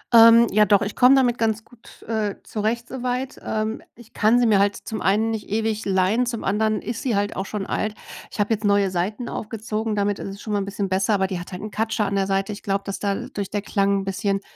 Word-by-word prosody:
Ähm, 230 +1 +9
ja, 210 +1 +5
doch. 200 0 +4
Ich 205 - -4
komme 255 +2 +6
damit 245 -3 +2
ganz 220 -1 0
gut, 240 -2 -18
äh, 215 -3 -2
zurecht, 230 +3 -2
soweit. 255 0 -3
Ähm, 220 +1 -2
ich 235 -1 -17
kann 220 +3 +3
sie 240 - +3
mir 210 -3 +4
halt 200 0 +2
zum 220 - -6
einen 215 +4 +2
nicht 215 -2 -5
ewig 220 0 -1
leihen, 195 +6 +2
zum 235 -2 -3
anderen 215 +1 0
ist 230 +1 -4
sie 240 -6 0
halt 205 0 -1
auch 190 +1 -3
schon 205 -2 -4
alt. 215 0 -2 0.3
Ich - - -11
habe 205 +2 +2
jetzt 220 - -3
neue 200 -2 +3
Seiten 205 +7 -2
aufgezogen. 220 0 -3
Damit 205 0 0
ist - - -5
es 195 +1 -9
schon 215 - -4
mal 205 - +2
'n - - -3
bisschen 200 0 -3
besser. 190 +3 +1
Aber 190 - +1
die 185 -2 -3
hat 175 - -9
halt 180 +1 -7
'n 215 - -6
Katscher 220 0 0
an 200 - -2
der 195 0 +1
Seite. 195 +1 0
Ich 205 - -7
glaube, 200 -1 -1
dass 195 - -4
dadurch 200 -1 -3
der 205 -1 -3
Klang 200 -1 +1
'n - - -5
bisschen 195 +1 -1
210 Hz, 250 wpm, -23 LUFS, 200-225 Hz, 0.3 s, Ähm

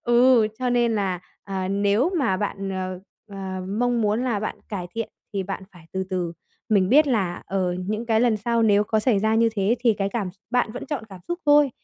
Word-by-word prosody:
Ừ, 240 -1 +5
cho 255 -1 0
nên 240 -2 +2
là, 190 -4 -1 0.2
à, 190 -1 -3
nếu 205 - +2
mà 230 -9 +2
bạn, 195 0 -3
ờ, 185 -1 -4 0.3
ờ, 190 -2 -5
mong 240 +3 +1
muốn 215 +4 +1
là 230 -5 0
bạn 215 - -4
cải 190 -4 -4
thiện 230 -1 -2 0.2
thì 200 -2 -1
bạn 190 0 -5
phải 175 -3 -16
từ 190 0 -1
từ. 180 -2 -1 0.4
Mình 195 -4 +3
biết 295 +6 +6
là, 195 -9 0
ờ, 185 -2 0
những 215 +3 -2
cái 225 -1 +3
lần 235 -2 +3
sau 230 +2 0
nếu 205 -1 +4
có 220 +1 +1
xảy 215 -3 +3
ra 220 +2 +2
như 230 +1 +4
thế 205 +3 +2
thì 235 -3 +3
cái 195 -1 -1
cảm 200 -4 -2
x - - -31
bạn 245 -3 +1
vẫn 245 - -6
chọn 275 -7 -3
cảm 190 -3 -11
xúc 345 - -2
thôi, 290 -1 +6
210 Hz, 230 wpm, -24 LUFS, 195-240 Hz, 0.4 s, biết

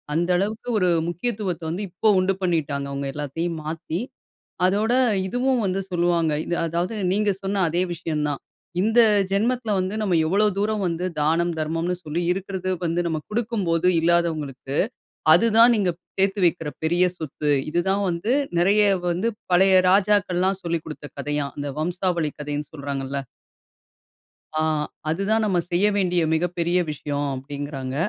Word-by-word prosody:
அந்த 175 +2 +1
அளவுக்கு 215 +5 -2
ஒரு 180 -2 +2 0.2
முக்கியத்துவத்த 185 -1 -3
வந்து 180 +6 -3
இப்போ 180 +5 -1
உண்டு 185 +1 +2
பண்ணிட்டாங்க 150 -6 -1
அவங்க 140 0 -3
எல்லாத்தையும் 160 +3 -3
மாத்தி. 160 +2 -4 0.7
அதோட 210 +5 +2 0.3
இதுவும் 250 +3 +1
வந்து 190 0 0
சொல்லுவாங்க. 170 -2 +1
இது 175 - -1
அதாவது 170 +6 -2 0.2
நீங்க 210 +1 +2
சொன்ன 195 0 0
அதே 170 +3 0
விஷயம் 155 -3 -2
தான். 145 - -4 0.4
இந்த 225 +4 +3 0.3
ஜென்மத்துல 225 +3 0
வந்து 185 +2 -1
நம்ம 190 -5 +2
எவ்ளோ 200 +6 +2
தூரம் 210 0 0
வந்து 170 +1 -2
தானம், 165 +3 +2
தர்மம்னு 165 +3 -1
சொல்லி 160 +2 -2
இருக்குறது 190 0 -3
வந்து 170 0 0
நம்ம 160 -2 -1
குடுக்கும்போது 205 -7 0
இல்லாதவங்களுக்கு, 160 -5 0 0.6
அதுதான் 230 +5 +6
நீங்க 195 -5 +1 0.3
சேத்து 195 +1 +2
வக்கிற 165 -2 +1
பெரிய 175 +3 +2
சொத்து. 150 -1 -2 0.2
இது 175 - +2
தான் 200 +1 +1
வந்து 175 +8 -1 0.3
நிறைய 200 +4 +4 0.3
வந்து 185 +7 0 0.2
பழைய 190 +2 +5
ராஜாக்கள்லாம் 190 -1 +2
சொல்லிக் 170 -2 -2
குடுத்த 155 -1 -8
கதையாம். 145 -1 -2
அந்த 145 0 -3
வம்சாவளி 175 -1 -1
கதைன்னு 145 0 -4
சொல்றாங்கள. 140 -1 -4 1.4
அ, - - +2 0.5
அதுதான் 200 +7 +1
நம்ம 190 -4 +1
செய்ய 185 +4 +3
வேண்டிய 180 -2 +2
மிகப்பெரிய 175 +1 0
விஷயம். 145 -1 -3
அப்படின்கிறாங்க. 135 -1 -5
175 Hz, 140 wpm, -23 LUFS, 155-195 Hz, 1.4 s, அதுதான்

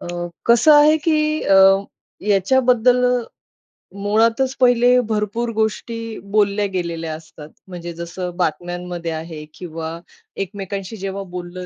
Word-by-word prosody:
अ, - - -8 0.4
कसं 235 +6 +6
आहे 300 +1 +6
की 305 -1 +1
अ, 195 - +3 0.7
याच्याबद्दल 245 +4 +3 1.0
मुळातच 230 +5 +2
पहिले 245 0 +5
भरपूर 215 +2 -1
गोष्टी 220 +1 -2 0.4
बोलल्या 205 0 +2
गेलेल्या 165 -3 -3
असतात. 155 -1 -12 0.2
म्हणजे 175 -2 -7
जसं 175 +1 -6
बातम्यांमध्ये 175 0 -3
आहे 160 -1 -7
किंवा 165 -1 -7 0.4
एकमेकांशी 195 +1 -6
जेव्हा 195 0 -5
बोललं 180 0 -6
195 Hz, 110 wpm, -20 LUFS, 175-235 Hz, 1.0 s, कसं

